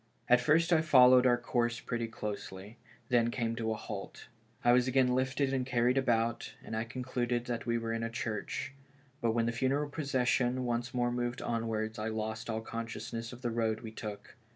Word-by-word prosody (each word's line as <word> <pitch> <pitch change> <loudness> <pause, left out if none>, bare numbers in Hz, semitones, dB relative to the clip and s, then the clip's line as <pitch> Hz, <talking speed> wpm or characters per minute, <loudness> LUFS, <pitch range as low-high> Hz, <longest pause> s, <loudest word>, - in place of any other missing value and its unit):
At 125 0 +5
first 165 +5 +3
I 160 - +5
followed 130 -4 +7
our 120 -1 +4
course 120 0 0
pretty 120 -3 -3
closely; 105 0 -7 0.3
then 120 -2 +3
came 115 -1 -2
a 110 -1 0
halt. 105 0 -7 0.3
I 120 - +5
was 125 +1 +4
again 130 0 +3
lifted 130 +2 0
and 130 -1 +1
carried 125 0 +2
about, 115 -3 0
and 110 - -5
I 110 +1 -1
concluded 120 0 -2
that 120 -1 -4
we 115 0 +2
were 115 0 -2
in 115 - -2
a 115 - -2
church; 115 +3 -4 0.5
but 115 -2 +2
when 115 0 +1
the 115 - +1
funeral 135 +4 0
procession 130 -3 +1
once 120 0 -1
more 120 -1 +1
moved 120 0 -2
onwards, 110 -1 -2
I 110 - -2
lost 110 0 -3
all 110 0 -1
consciousness 115 0 -5
of 125 +1 -11
the 120 - 0
road 110 -1 0
we 110 - -7
took. 105 -2 -8
120 Hz, 190 wpm, -32 LUFS, 115-125 Hz, 0.5 s, followed